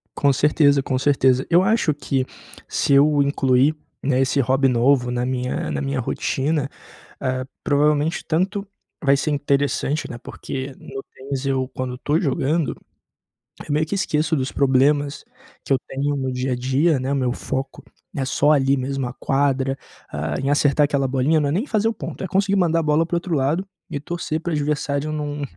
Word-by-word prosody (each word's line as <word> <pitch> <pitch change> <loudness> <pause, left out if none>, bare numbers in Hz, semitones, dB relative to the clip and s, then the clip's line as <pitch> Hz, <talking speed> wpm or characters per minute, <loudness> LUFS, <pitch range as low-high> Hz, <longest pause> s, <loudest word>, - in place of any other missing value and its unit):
Com 140 -1 +3
certeza, 145 +1 +3
com 130 -1 -1
certeza. 130 -2 +3
Eu 175 +2 +5
acho 200 -7 +2
que 135 -2 -1 0.4
se 140 - +1
eu 145 +1 +5
incluir, 140 +1 +2 0.3
né, 135 -1 +2
esse 135 +2 +1
hobby 135 +2 +2
novo 125 0 +3
na 125 0 -1
minha 125 0 -2
na - - -2
minha 135 -1 -2
rotina, 140 +4 -1 0.5
ah, 130 -1 -1 0.2
provavelmente 150 +2 +1
tanto 195 +5 -1 0.4
vai 140 -1 +5
ser 150 +2 -1
interessante, 145 +1 0
né, 120 - -6
porque 130 +2 -6
no 135 0 -8
tênis 135 0 -5
eu, 130 -1 0
quando 130 -1 -4
estou 145 +5 0
jogando, 150 0 0 0.9
eu 150 - -3
meio 155 +2 +1
que 160 - -3
esqueço 155 -4 0
dos 130 -1 -2
problemas 140 +2 +2 0.4
que - - -1
eu 135 - +4
tenho 140 +2 -1
no 130 -1 -2
dia 125 +1 -2
a 125 - 0
dia, 135 +4 +2
né. 130 +2 -2
O - - +1
meu 125 -2 0
foco 135 +1 -4 0.3
é 135 - -1
só 145 +2 +2
ali 135 -1 +3
mesmo, 135 0 -2
a 120 - -5
quadra, 135 -1 0 0.4
ah, - - -3
em 135 +1 -1
acertar 145 0 +3
aquela 140 -2 +1
bolinha, 135 +5 +2
não 145 - +1
é - - -1
nem 200 - 0
fazer 220 -4 +1
o 225 - -2
ponto, - - -7
é - - -4
conseguir 195 +2 +1
mandar 165 -3 +2
a - - -1
bola 155 +1 +2
para 175 - -1
outro 170 0 -2
lado 150 +7 0 0.2
e 145 - -2
torcer 160 0 -3
para 170 - -4
o - - 0
adversário 145 0 -1
não 145 -1 -3
140 Hz, 190 wpm, -22 LUFS, 130-150 Hz, 0.9 s, Eu